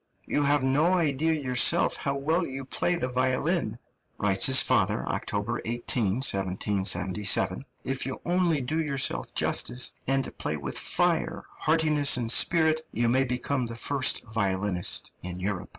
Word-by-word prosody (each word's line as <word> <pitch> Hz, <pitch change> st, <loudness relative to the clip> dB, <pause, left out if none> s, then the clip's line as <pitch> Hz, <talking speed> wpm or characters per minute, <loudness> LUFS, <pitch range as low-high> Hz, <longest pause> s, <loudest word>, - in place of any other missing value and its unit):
"You 145 Hz, -, -1 dB
have 145 Hz, -1 st, +2 dB
no 145 Hz, +7 st, +2 dB
idea 160 Hz, -3 st, +1 dB
yourself 130 Hz, -5 st, +2 dB
how 140 Hz, 0 st, -3 dB
well 160 Hz, +5 st, -1 dB
you 135 Hz, 0 st, -7 dB
play 175 Hz, +6 st, 0 dB
the 125 Hz, -, -3 dB
violin," 130 Hz, -, -1 dB, 0.4 s
writes 100 Hz, -1 st, +2 dB
his 130 Hz, 0 st, +6 dB
father -, -, +1 dB
(October 105 Hz, +4 st, -3 dB
18, 120 Hz, -1 st, -1 dB
1777); 100 Hz, +1 st, +1 dB, 0.2 s
"if 135 Hz, 0 st, -2 dB
you 130 Hz, -, -5 dB
only 175 Hz, -4 st, +1 dB
do 155 Hz, +6 st, -2 dB
yourself 140 Hz, -4 st, -1 dB
justice, 125 Hz, 0 st, +1 dB, 0.2 s
and 135 Hz, 0 st, -1 dB
play 75 Hz, -, -2 dB
with 70 Hz, -2 st, -6 dB
fire, -, -, 0 dB
heartiness, 155 Hz, -4 st, +3 dB
and 115 Hz, -2 st, 0 dB
spirit, 160 Hz, +1 st, +3 dB
you 115 Hz, +1 st, 0 dB
may 130 Hz, +3 st, +2 dB
become 125 Hz, +1 st, -2 dB
the 115 Hz, -, -7 dB
first 135 Hz, +3 st, +1 dB
violinist 100 Hz, -4 st, -1 dB
in 90 Hz, 0 st, -5 dB
Europe." 95 Hz, 0 st, -4 dB
130 Hz, 145 wpm, -26 LUFS, 105-145 Hz, 0.4 s, his